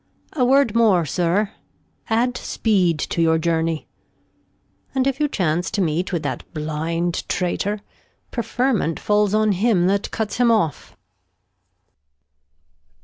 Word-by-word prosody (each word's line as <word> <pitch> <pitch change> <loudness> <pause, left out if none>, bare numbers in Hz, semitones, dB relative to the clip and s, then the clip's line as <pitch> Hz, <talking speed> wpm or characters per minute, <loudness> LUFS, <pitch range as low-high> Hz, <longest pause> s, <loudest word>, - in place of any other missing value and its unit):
A 265 - +1
Word 265 -2 +4
more. 205 -8 +4
Sir, 180 +7 0 0.6
add 240 +3 +1
Speed 185 -11 +1
to 170 - -2
your 160 0 +3
Journey, 165 -1 -1 1.1
And 260 -1 +2
if 275 0 0
you 300 - +2
chance 175 - -1
to - - -3
meet 175 +1 0
with 170 -3 -2
that 140 - -3
blind 160 +3 -2
Traitor, 200 +3 -1 0.5
Preferment 240 -7 0
falls 210 -1 +2
on 215 0 +3
him 195 -2 +2
that 200 +2 +1
cuts 220 -2 -3
him 245 -1 +4
off. 160 - 0
195 Hz, 125 wpm, -21 LUFS, 165-225 Hz, 1.1 s, Word